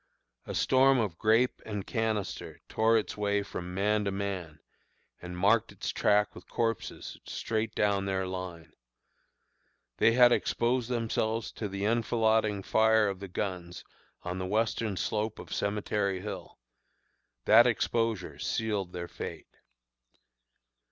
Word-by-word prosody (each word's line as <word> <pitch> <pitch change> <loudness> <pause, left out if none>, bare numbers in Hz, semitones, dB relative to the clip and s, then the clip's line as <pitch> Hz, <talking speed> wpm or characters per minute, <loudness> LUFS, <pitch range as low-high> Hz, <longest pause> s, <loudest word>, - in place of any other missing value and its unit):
A - - -4
storm 135 +1 +4
of 105 -8 -1
grape 115 +4 +3
and 105 -2 -5
canister 110 -4 -2
tore 115 +1 +3
its 110 - -2
way 100 -1 0
from 90 -2 -6
man 105 +2 +2
to 100 - 0
man, 95 -5 -4 0.6
and 90 0 -7
marked 105 +5 +3
its - - -4
track 105 0 +2
with 90 - -13
corpses 115 -2 -3
straight 110 0 -3
down 100 -1 +1
their 95 -1 -1
line! 90 -3 -6 1.2
They 115 - +5
had 120 0 +7
exposed 120 0 +1
themselves 115 -2 -1
to 105 - -5
the 100 +1 -3
enfilading 110 -2 +2
fire 110 0 +4
of 95 -1 -5
the 100 - -6
guns 90 -2 -4 0.4
on 90 +1 -4
the 95 - -3
western 110 0 0
slope 110 +2 -1
of - - -8
Cemetery 100 -2 -1
Hill; 100 -1 -7 0.9
that 115 +3 +7
exposure 115 -3 -1
sealed 105 -5 -2
their 85 -1 -5
fate. - - -8
105 Hz, 130 wpm, -30 LUFS, 95-115 Hz, 1.2 s, had